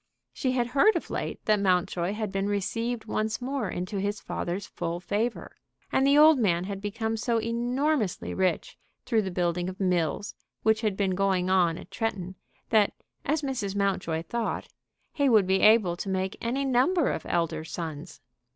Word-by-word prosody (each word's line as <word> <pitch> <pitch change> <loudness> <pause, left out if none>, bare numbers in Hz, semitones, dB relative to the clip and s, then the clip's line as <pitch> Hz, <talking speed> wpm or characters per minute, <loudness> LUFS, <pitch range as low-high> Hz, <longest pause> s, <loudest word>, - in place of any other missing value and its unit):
She 255 -3 -1
had 245 -2 +1
heard 285 - +4
of - - -3
late - - -4
that 215 -1 +3
Mountjoy 180 -1 +1
had 210 -2 -3
been 195 +1 -1
received 230 +4 -2
once 215 0 -1
more 255 -4 -2
into 185 +3 -3
his 205 +2 -2
father's 185 +4 -4
full 170 +1 -4
favor. 210 +6 -3 0.3
And 270 - +3
the 280 +1 +5
old 305 -1 +7
man 175 -6 +2
had 195 +1 -5
become 220 +2 -2
so 230 +1 0
enormously 240 - -1
rich 185 -1 -1 0.3
through 225 -3 +2
the 195 - -3
building 175 0 -1
of 185 - -9
mills 180 +1 0 0.3
which 220 0 +3
had 210 -4 -1
been 195 -2 +1
going 185 -1 +1
on 175 -3 +3
at - - -11
Tretton, 195 -5 -3 0.4
that, 215 -3 +4 0.3
as 305 +1 0
Mrs. 240 -8 -2
Mountjoy 185 -5 0
thought, 235 +5 -3 0.4
he 285 -3 +2
would 215 -5 +5
be 190 +1 +2
able 215 -5 +5
to 195 - -4
make 190 0 -1
any 260 +4 -1
number 270 +6 +3
of - - -4
elder 165 -2 0
sons. 160 -1 -7
205 Hz, 175 wpm, -27 LUFS, 185-235 Hz, 0.4 s, old